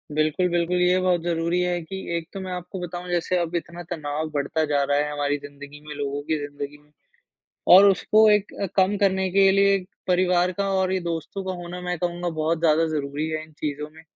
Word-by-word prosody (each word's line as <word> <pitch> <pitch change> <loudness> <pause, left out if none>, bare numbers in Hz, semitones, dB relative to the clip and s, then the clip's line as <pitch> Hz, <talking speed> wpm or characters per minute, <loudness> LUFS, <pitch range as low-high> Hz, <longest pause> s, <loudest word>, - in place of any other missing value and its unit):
बिल्कुल, 155 +4 +2
बिल्कुल, 175 +1 +1
ये 180 +1 +4
बहुत 180 -2 +2
ज़रूरी 170 +1 0
है 180 -1 0
कि 170 +4 -7 0.2
एक 165 -1 -6
तो 195 - -5
मैं 185 -1 -6
आपको 180 +1 -6
बताऊँ, 175 0 -6
जैसे 175 +1 0
अब 170 0 -2
इतना 175 +1 -4
तनाव 155 -1 -3
बढ़ता 145 +2 0
जा 145 -1 +1
रहा 145 +1 +1
है 150 0 0
हमारी 145 0 -1
ज़िंदगी 145 0 -11
में, 150 - -6
लोगों 145 0 -3
की 160 - +1
ज़िंदगी 145 0 -6
में 150 - -29 0.8
और 190 +2 +10
उसको 215 +3 +4
एक 210 -1 +1
अ, - - +1
कम 195 +1 +3
करने 190 -1 +1
के 195 +1 +5
लिए 200 0 +4 0.3
परिवार 180 0 +2
का 200 0 0
और 190 -1 +1
ये 190 - +1
दोस्तों 170 +3 -4
का 185 - -2
होना 175 +1 -7
मैं 180 0 -3
कहूँगा 175 0 -2
बहुत 160 0 -1
ज़्यादा 165 0 +3
ज़रूरी 150 0 -2
है 155 0 -3
इन 155 - -16
चीज़ों 150 0 -3
में। 160 +1 -16
170 Hz, 215 wpm, -24 LUFS, 150-180 Hz, 0.8 s, और